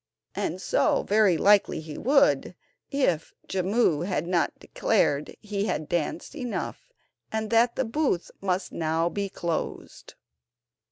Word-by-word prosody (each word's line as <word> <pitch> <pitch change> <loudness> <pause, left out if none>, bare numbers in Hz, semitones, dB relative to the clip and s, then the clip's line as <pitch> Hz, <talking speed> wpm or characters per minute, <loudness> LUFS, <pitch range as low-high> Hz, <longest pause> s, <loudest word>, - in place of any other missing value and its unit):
And - - -2
so - - +2
very 205 -4 +3
likely 200 +4 +4
he 155 -1 -8
would, 275 +2 +3 0.3
if 180 - 0
Jimmu 185 -3 +1
had 180 -5 -1
not 175 -1 0
declared 145 +1 0
he 205 -1 -2
had 155 - -2
danced 170 -3 -2
enough, 255 - -5 0.4
and 220 0 -2
that 235 +1 +4
the 260 - 0
booth 230 - -1
must 190 -1 -1
now 165 +1 0
be 200 +2 -3
closed. 170 -3 -5
195 Hz, 125 wpm, -26 LUFS, 170-230 Hz, 0.4 s, likely